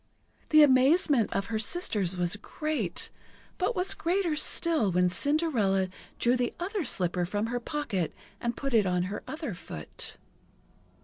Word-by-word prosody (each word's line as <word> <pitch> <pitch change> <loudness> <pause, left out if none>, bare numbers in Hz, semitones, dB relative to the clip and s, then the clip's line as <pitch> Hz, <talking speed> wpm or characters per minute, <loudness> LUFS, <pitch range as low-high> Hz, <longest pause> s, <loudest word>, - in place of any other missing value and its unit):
The 310 -1 +7
amazement 270 - +4
of 195 0 -2
the 220 -1 -1
sisters 210 - 0
was 175 +1 +1
great, 250 - -2 0.5
but 385 +6 0
was 370 +2 +1
greater 365 -3 0
still 310 - +3
when 180 0 +2
Cinderella 225 - +1 0.3
drew 240 +1 +2
the 245 -1 -1
other 385 +2 -2
slipper 180 - +1
from 205 +4 -2
her 245 +2 -2
pocket 235 - -3 0.3
and 235 -1 -3
put 275 -2 -3
it 215 -4 +4
on 180 -1 +1
her 200 +3 -4
other 310 - -5
foot. 80 - -5
240 Hz, 145 wpm, -28 LUFS, 190-310 Hz, 0.5 s, The